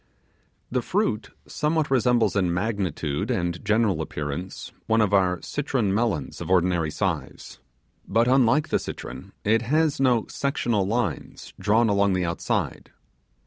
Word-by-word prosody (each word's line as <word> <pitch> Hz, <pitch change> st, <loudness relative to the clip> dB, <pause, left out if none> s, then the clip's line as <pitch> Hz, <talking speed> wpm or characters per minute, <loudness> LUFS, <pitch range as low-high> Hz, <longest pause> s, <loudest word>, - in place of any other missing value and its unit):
The -, -, +1 dB
fruit -, -, -1 dB, 0.2 s
somewhat 155 Hz, -1 st, 0 dB
resembles 120 Hz, -5 st, +3 dB
in 90 Hz, -3 st, +2 dB
magnitude 95 Hz, -, -2 dB
and 85 Hz, -7 st, -1 dB
general 105 Hz, -5 st, +2 dB
appearance 75 Hz, +4 st, -5 dB, 0.2 s
one 110 Hz, 0 st, +3 dB
of 105 Hz, -2 st, +2 dB
our 90 Hz, -2 st, +3 dB
citron 130 Hz, -8 st, -1 dB
melons 100 Hz, -, -1 dB
of -, -, -5 dB
ordinary 90 Hz, -3 st, +2 dB
size; 80 Hz, -6 st, -4 dB, 0.5 s
but, 115 Hz, +4 st, +2 dB
unlike 130 Hz, +3 st, +3 dB
the -, -, +2 dB
citron, -, -, -8 dB
it 110 Hz, +2 st, +3 dB
has 150 Hz, +5 st, +1 dB
no 125 Hz, -4 st, +3 dB
sectional 120 Hz, -8 st, -1 dB
lines 115 Hz, 0 st, -3 dB
drawn 110 Hz, +3 st, +3 dB
along 100 Hz, -1 st, +2 dB
the 90 Hz, -1 st, 0 dB
outside. 85 Hz, -1 st, -2 dB
105 Hz, 135 wpm, -25 LUFS, 90-120 Hz, 0.5 s, resembles